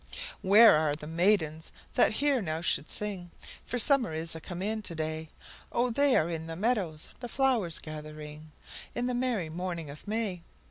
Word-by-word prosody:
Where 210 +3 +8
are 155 -1 +2
the 150 - -9
maidens 160 -1 +1 0.2
that - - +4
here 280 +1 +2
now 160 -3 -2
should 150 -3 +1
sing? 195 -4 -4 0.3
For 245 - -3
summer 245 - +4
is 165 +1 -3
a 160 - -7
come 175 +3 -6
in 215 +2 -1
to 175 -5 -3
day, 155 0 -3 0.4
Oh, 245 +1 +1
they 280 +2 +4
are 155 - +3
in 165 -1 -4
the 165 - -5
meadows 190 -6 -1
the 245 0 -6
flowers 235 - +1
gathering, 155 0 -9 0.4
In 240 - -1
the 250 - -1
merry 240 -10 -1
morning 170 -3 -4
of 150 +7 -12
May! 210 -5 -2
175 Hz, 180 wpm, -29 LUFS, 155-225 Hz, 0.4 s, Where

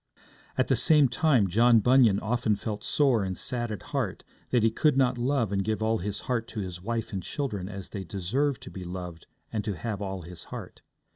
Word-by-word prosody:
At - - +2
the - - +3
same 150 -4 +6
time, 125 -4 +3
John 115 +5 +5
Bunyan 120 -3 +5
often 115 -1 +1
felt 105 0 -5
sore 130 -8 +2
and 95 -1 -3
sad 120 -2 -2
at 105 - -6
heart - - -2 0.3
that 120 -3 +2
he 115 - +4
could 145 +4 +2
not 125 -2 +2
love 125 -4 +1
and 100 -1 0
give 110 +1 -1
all 110 0 +1
his 100 +2 -4
heart 115 -3 -2
to 110 - -6
his 90 -3 -5
wife 115 +2 -3
and 95 - -2
children 100 - -3
as 100 -2 -7
they 100 -3 -5
deserved 110 - -1
to - - -9
be 95 - -7
loved 90 -2 -7 0.3
and 110 -2 -1
to 105 -5 -3
have 105 +3 -4
all 95 -2 -4
his 85 -1 -10
heart. - - -9
110 Hz, 215 wpm, -28 LUFS, 95-125 Hz, 0.3 s, same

